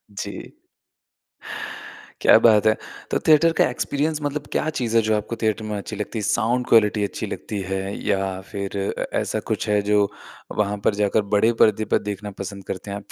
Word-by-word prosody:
जी। -, -, -6 dB, 1.7 s
क्या -, -, +7 dB
बात 110 Hz, -2 st, +5 dB
है। 110 Hz, -, +6 dB, 0.4 s
तो -, -, +2 dB
थिएटर 160 Hz, +2 st, +6 dB
का -, -, +4 dB
एक्सपीरियंस 150 Hz, +4 st, -1 dB
मतलब 145 Hz, 0 st, -3 dB
क्या 155 Hz, -, 0 dB
चीज़ 115 Hz, -2 st, -1 dB
है, -, -, +6 dB
जो 110 Hz, 0 st, +2 dB
आपको 110 Hz, +3 st, -4 dB
थिएटर 110 Hz, -1 st, 0 dB
में 105 Hz, -1 st, -3 dB
अच्छी 105 Hz, +2 st, -6 dB
लगती 105 Hz, +2 st, -4 dB
है? -, -, -4 dB
साउंड 120 Hz, +4 st, +1 dB
क्वालिटी 105 Hz, -2 st, +4 dB
अच्छी 100 Hz, -, -3 dB
लगती 105 Hz, -, -5 dB
है 95 Hz, 0 st, 0 dB, 0.3 s
या 95 Hz, -2 st, 0 dB
फिर 100 Hz, 0 st, -4 dB, 0.2 s
अ, -, -, -1 dB
ऐसा -, -, -2 dB
कुछ -, -, -1 dB
है 105 Hz, -1 st, +3 dB
जो 105 Hz, -1 st, +4 dB, 0.5 s
वहाँ 105 Hz, -1 st, +1 dB
पर 100 Hz, -, +3 dB
जाकर 105 Hz, +1 st, +2 dB
बड़े 115 Hz, +3 st, +4 dB
पर्दे 110 Hz, 0 st, +3 dB
पर -, -, +3 dB
देखना 105 Hz, +1 st, -6 dB
पसंद 100 Hz, 0 st, -6 dB
करते 95 Hz, +2 st, -5 dB
हैं 100 Hz, -, -3 dB
आप? 100 Hz, -, -13 dB
105 Hz, 190 wpm, -23 LUFS, 100-115 Hz, 1.7 s, क्या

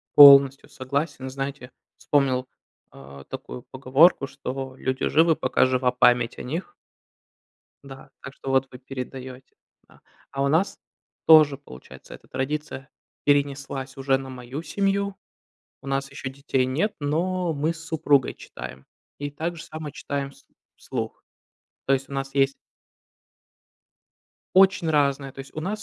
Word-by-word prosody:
Полностью 140 Hz, -1 st, +9 dB
согласен. 135 Hz, 0 st, -3 dB
Знаете, 135 Hz, -1 st, -5 dB, 0.3 s
вспомнил, 130 Hz, -3 st, +1 dB, 0.5 s
а, 70 Hz, 0 st, -13 dB
такую 125 Hz, -, -8 dB
поговорку, 135 Hz, +3 st, +4 dB
что 135 Hz, -1 st, -6 dB
люди 130 Hz, 0 st, -1 dB
живы, 160 Hz, +1 st, +4 dB
пока -, -, +2 dB
жива 130 Hz, -1 st, +1 dB
память 125 Hz, -1 st, +3 dB
о -, -, -6 dB
них. 170 Hz, -, -5 dB, 1.1 s
Да, 135 Hz, -1 st, -12 dB
так 140 Hz, -, -9 dB
что 135 Hz, -, -8 dB
вот 135 Hz, 0 st, +2 dB
вы 125 Hz, -, -11 dB
передаёте, 130 Hz, 0 st, -8 dB, 0.3 s
да. -, -, -22 dB, 0.3 s
А 135 Hz, 0 st, -1 dB
у -, -, +2 dB
нас 160 Hz, +8 st, +1 dB, 0.5 s
тоже 155 Hz, -3 st, +7 dB
получается 65 Hz, -, -13 dB
эта -, -, -14 dB
традиция 145 Hz, 0 st, -4 dB, 0.3 s
перенеслась 140 Hz, -2 st, 0 dB
уже 135 Hz, 0 st, +2 dB
на 135 Hz, 0 st, -8 dB
мою 130 Hz, +3 st, -7 dB
семью. 200 Hz, +2 st, -1 dB, 0.7 s
У -, -, -15 dB
нас 135 Hz, 0 st, -2 dB
еще 135 Hz, 0 st, -6 dB
детей 135 Hz, -1 st, -1 dB
нет, 160 Hz, +12 st, 0 dB
но 170 Hz, +4 st, 0 dB
мы 155 Hz, +2 st, 0 dB
с 165 Hz, -1 st, -12 dB
супругой 150 Hz, -4 st, +2 dB
читаем 65 Hz, +1 st, -10 dB, 0.3 s
и 145 Hz, 0 st, -4 dB
также 165 Hz, +3 st, -4 dB
само 155 Hz, -1 st, -7 dB
читаем 140 Hz, -1 st, -4 dB
вс 140 Hz, -, -21 dB, 0.3 s
вслух. -, -, -6 dB, 0.6 s
То 135 Hz, -, +3 dB
есть 135 Hz, +1 st, -1 dB
у -, -, -8 dB
нас 135 Hz, 0 st, -4 dB
есть 135 Hz, 0 st, +3 dB, 2.0 s
Очень 190 Hz, -3 st, +5 dB
разные, 140 Hz, -3 st, +1 dB
то -, -, -14 dB
есть 135 Hz, -, -9 dB
у -, -, -4 dB
нас 205 Hz, +6 st, -3 dB
140 Hz, 140 wpm, -24 LUFS, 130-150 Hz, 2.0 s, Полностью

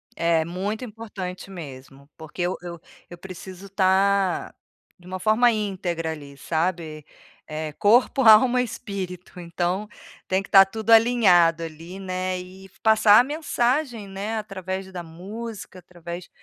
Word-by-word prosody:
É 165 Hz, -1 st, +2 dB
muito 195 Hz, +7 st, -4 dB
importante 200 Hz, -5 st, -8 dB
mesmo, 140 Hz, -4 st, -11 dB
porque 160 Hz, +2 st, -8 dB
eu 175 Hz, +1 st, -1 dB
eu 170 Hz, -1 st, -8 dB, 0.3 s
eu 175 Hz, -, -10 dB
preciso 185 Hz, +1 st, -10 dB
estar 195 Hz, -1 st, +1 dB, 0.5 s
de 175 Hz, -, -20 dB
uma 185 Hz, +1 st, -6 dB
forma 220 Hz, +4 st, +4 dB
íntegra 180 Hz, -6 st, -3 dB
ali, 145 Hz, -3 st, -9 dB
sabe? 160 Hz, -2 st, -3 dB, 0.4 s
Eh, 155 Hz, 0 st, -4 dB
corpo, 240 Hz, -, +3 dB
alma, 240 Hz, +3 st, +7 dB
espírito, 195 Hz, -7 st, -6 dB
então 175 Hz, +4 st, -2 dB, 0.4 s
tem 190 Hz, +1 st, +1 dB
que 195 Hz, -, -13 dB
estar 195 Hz, -1 st, +8 dB
tudo 220 Hz, +3 st, -7 dB
alinhado 190 Hz, -8 st, +5 dB
ali, 165 Hz, +3 st, -9 dB
né, 185 Hz, -1 st, -3 dB
e 190 Hz, +1 st, -12 dB
passar 220 Hz, -1 st, +6 dB
a -, -, +5 dB
mensagem 260 Hz, -5 st, -1 dB
né 200 Hz, +3 st, -4 dB
através 190 Hz, -2 st, -5 dB
da 180 Hz, -2 st, -6 dB
música, 195 Hz, +5 st, -9 dB
através 175 Hz, 0 st, -9 dB
190 Hz, 135 wpm, -24 LUFS, 175-215 Hz, 0.5 s, estar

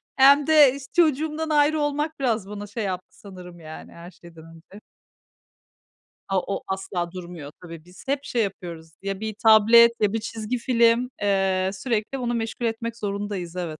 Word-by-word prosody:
hem 280 Hz, +2 st, +6 dB
de 295 Hz, -4 st, +6 dB
iş 280 Hz, -, -9 dB
çocuğumdan 315 Hz, -1 st, +1 dB
ayrı 300 Hz, +1 st, +3 dB
olmak, 295 Hz, +1 st, -2 dB
biraz 225 Hz, -6 st, -1 dB
bana 205 Hz, 0 st, -7 dB
şey 225 Hz, +1 st, -5 dB
yaptı 185 Hz, -2 st, -6 dB
sanırım, 180 Hz, -3 st, -12 dB
yani, 155 Hz, -1 st, -11 dB
her 170 Hz, +2 st, -12 dB
şeyden 165 Hz, -2 st, -15 dB
önce. 190 Hz, +6 st, -16 dB, 1.5 s
A, 195 Hz, -1 st, +1 dB
o 200 Hz, -, -4 dB
asla 190 Hz, -2 st, -3 dB
durmuyor 170 Hz, -5 st, -9 dB
tabii, 165 Hz, -2 st, -10 dB
biz 180 Hz, 0 st, -16 dB
hep 280 Hz, 0 st, -1 dB
şey 235 Hz, -2 st, 0 dB
yapıyoruz: 170 Hz, -5 st, -6 dB
Ya 195 Hz, 0 st, -4 dB
bir 220 Hz, -1 st, -4 dB
tablet 225 Hz, +2 st, +7 dB
ya 210 Hz, -1 st, +2 dB
bir 225 Hz, -, -1 dB
çizgi 225 Hz, +2 st, -4 dB
film. 235 Hz, 0 st, +2 dB
Eee, 190 Hz, -2 st, +1 dB
sürekli 225 Hz, +4 st, -3 dB
onu 240 Hz, -1 st, -2 dB
meşgul 230 Hz, +1 st, -3 dB
etmek 230 Hz, +1 st, -3 dB
zorundayız, 200 Hz, -4 st, -5 dB
evet. 165 Hz, -4 st, -5 dB
210 Hz, 165 wpm, -24 LUFS, 185-250 Hz, 1.5 s, tablet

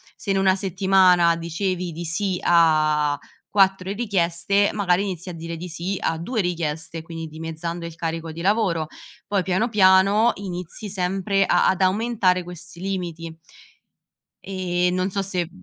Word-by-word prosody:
se 200 Hz, -, -4 dB
in 195 Hz, -, +2 dB
una 190 Hz, -1 st, +4 dB
settimana 185 Hz, -2 st, +3 dB
dicevi 175 Hz, +2 st, -3 dB
di 170 Hz, +2 st, -6 dB
sì 180 Hz, +2 st, -1 dB
a 155 Hz, -3 st, +3 dB, 0.3 s
4 195 Hz, -1 st, +2 dB
richieste, 200 Hz, -2 st, +1 dB
magari 195 Hz, -2 st, +1 dB
inizi 185 Hz, -2 st, -5 dB
a -, -, -6 dB
dire 165 Hz, 0 st, -6 dB
di 175 Hz, +2 st, -7 dB
sì 175 Hz, +4 st, -3 dB
a 165 Hz, -, -1 dB
2 215 Hz, +8 st, -2 dB
richieste, 165 Hz, -2 st, -3 dB
quindi 165 Hz, 0 st, -7 dB
dimezzando 165 Hz, +2 st, -6 dB
il 170 Hz, -1 st, -8 dB
carico 165 Hz, 0 st, -4 dB
di 165 Hz, +1 st, -7 dB
lavoro. 185 Hz, -5 st, +1 dB, 0.4 s
Poi 200 Hz, -2 st, 0 dB
piano 190 Hz, +6 st, 0 dB
piano 200 Hz, +2 st, +5 dB
inizi 185 Hz, +1 st, -6 dB
sempre 195 Hz, +1 st, 0 dB
a -, -, +3 dB
ad 190 Hz, 0 st, 0 dB
aumentare 190 Hz, -2 st, +2 dB
questi 175 Hz, 0 st, -10 dB
limiti. 170 Hz, -4 st, -4 dB, 1.1 s
E 180 Hz, -2 st, -1 dB
non 185 Hz, +1 st, 0 dB
so 195 Hz, -, -1 dB
se 180 Hz, -3 st, -2 dB
180 Hz, 150 wpm, -23 LUFS, 165-195 Hz, 1.1 s, piano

